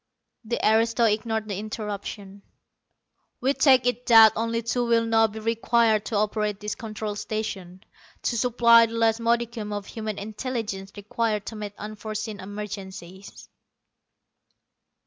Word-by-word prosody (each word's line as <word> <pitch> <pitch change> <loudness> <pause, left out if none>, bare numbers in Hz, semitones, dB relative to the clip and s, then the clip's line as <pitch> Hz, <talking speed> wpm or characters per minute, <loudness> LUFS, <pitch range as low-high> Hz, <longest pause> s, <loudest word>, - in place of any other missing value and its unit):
The 235 +1 -3
aristo 230 +2 +3
ignored 220 0 0
the 200 -2 -4
interruption. 205 -2 -6 1.0
"We 270 +2 +1
take 265 -4 +4
it 245 0 -1
that 225 -2 +8
only 230 +1 -1
two 240 +2 0
will 230 -1 +3
now 225 0 +4
be 215 0 -10
required 225 -1 +1
to 220 - -4
operate 210 0 0
this 210 0 -4
Control 215 -2 -5
Station, 195 -4 -5 0.4
to 240 - 0
supply 235 -1 +5
the 225 - -9
last 225 0 +2
modicum 230 -2 -1
of 205 -1 -4
human 215 -1 -5
intelligence 210 -2 -5
required 210 0 -2
to 225 - -7
meet 210 -1 -6
unforeseen 215 0 -6
emergencies." 195 -2 -8
220 Hz, 130 wpm, -25 LUFS, 210-230 Hz, 1.0 s, that